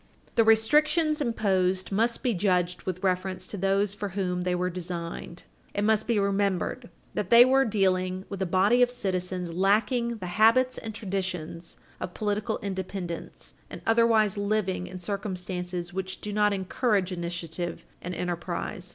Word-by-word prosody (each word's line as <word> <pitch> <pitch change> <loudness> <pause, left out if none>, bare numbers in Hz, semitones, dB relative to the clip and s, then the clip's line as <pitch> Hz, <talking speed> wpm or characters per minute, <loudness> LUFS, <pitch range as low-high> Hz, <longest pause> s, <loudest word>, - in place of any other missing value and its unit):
The 230 - +4
restrictions 300 +8 +3
imposed 190 -7 +1
must 230 +6 +1
be 250 -3 +2
judged 180 -2 +1
with 185 +1 -3
reference 185 0 -1
to 205 - -8
those 195 +1 +1
for 205 0 -4
whom 180 -2 -1
they 180 0 +1
were 180 +1 -1
designed. 170 -1 -6 0.3
It 205 - 0
must 220 0 +2
be 235 -2 +2
remembered 200 -1 0 0.2
that - - -2
we 235 0 +9
are 265 +2 +4
dealing 185 -4 0
with 195 -1 -6
a 190 - 0
body 195 +7 +3
of 245 - +5
citizens 185 -6 -2
lacking 220 +6 +2
the 185 - -7 0.2
habits 255 +3 +5
and 220 -2 -7
traditions 185 -5 -4 0.2
of 180 - -6
political 210 +1 -1
independence 190 -3 -5 0.2
and - - -9
otherwise 225 -3 +3
living 200 -3 -1
in 185 0 -8
circumstances 180 -2 -4
which 190 0 -4
do 210 - -5
not 210 0 +3
encourage 195 0 0
initiative 175 -1 -4 0.2
and 180 +1 -5
enterprise. 175 +1 -4
195 Hz, 150 wpm, -27 LUFS, 180-215 Hz, 0.3 s, we